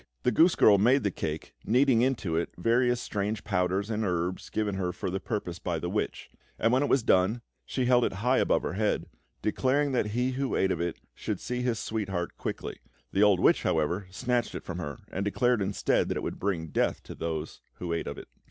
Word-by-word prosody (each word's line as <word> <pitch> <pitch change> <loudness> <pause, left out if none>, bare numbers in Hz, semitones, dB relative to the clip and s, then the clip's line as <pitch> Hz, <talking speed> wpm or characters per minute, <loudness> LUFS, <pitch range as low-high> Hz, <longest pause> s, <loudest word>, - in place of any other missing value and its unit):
The 125 - +3
goose 165 +9 +5
girl 100 -2 +6
made 125 +5 +4
the 100 - +1
cake, 80 -2 -4
kneading 125 0 +4
into 120 -10 0
it 85 - 0
various 120 +5 +2
strange 105 -1 -2
powders 95 +2 0
and 110 0 -1
herbs 90 -1 -2
given 105 -2 -1
her 95 -2 -1
for 90 - -4
the 95 - -2
purpose 90 -4 -4
by - - -2
the - - -3
witch; - - -3 0.3
and 115 +2 +2
when 130 - +4
it 145 - +1
was 135 - +3
done, 100 +6 +3 0.2
she 130 - -1
held 125 0 +4
it - - 0
high 125 +7 +2
above - - +2
her - - -2
head, 105 +2 0 0.4
declaring 135 +6 +1
that 125 -5 +1
he 125 +4 0
who 135 +1 -1
ate 95 - +2
of 85 - -1
it 85 0 -2 0.2
should - - -4
see 125 0 -3
his 125 -2 0
sweetheart 95 -6 -3
quickly. - - -5 0.3
The 95 - +1
old 105 -3 +5
witch, - - +4
however, 85 +5 0
snatched 120 +5 -1
it - - -5
from 85 0 -5
her 75 -5 -5
and 95 - -2
declared 120 +3 +2
instead 100 +1 +1
that - - -1
it - - -3
would - - -4
bring 85 -5 -1
death - - 0
to - - -8
those 80 -1 -4
who 85 -2 -4
ate 85 - -2
of - - -5
it. - - -9
105 Hz, 220 wpm, -28 LUFS, 90-125 Hz, 0.4 s, girl